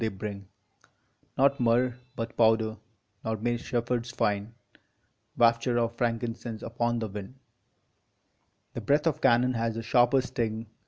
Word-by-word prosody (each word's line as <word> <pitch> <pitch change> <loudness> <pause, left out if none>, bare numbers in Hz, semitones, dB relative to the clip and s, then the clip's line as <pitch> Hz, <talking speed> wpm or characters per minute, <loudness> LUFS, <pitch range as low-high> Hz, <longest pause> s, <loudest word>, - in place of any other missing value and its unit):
they 115 - +1
bring 100 -1 -6 0.9
Not 140 +1 +3
myrrh, 120 +1 +2 0.2
but 115 -2 -5
powder; 110 -1 +3 0.5
nor 110 0 -1
may 120 +2 0
shepherds 120 0 -2
find 105 -3 -1 0.9
Wafture 120 +1 +3
of 115 0 0
frankincense 115 -1 -3
upon 120 +1 -1
the 115 -1 -2
wind: 100 +4 -8 1.4
The - - -5
breath 145 +2 +2
of 160 -4 0
cannon 125 0 +4
has 115 -1 -1
a 115 - -4
sharper 120 +3 +4
sting! 115 -3 -3
115 Hz, 130 wpm, -28 LUFS, 110-120 Hz, 1.4 s, cannon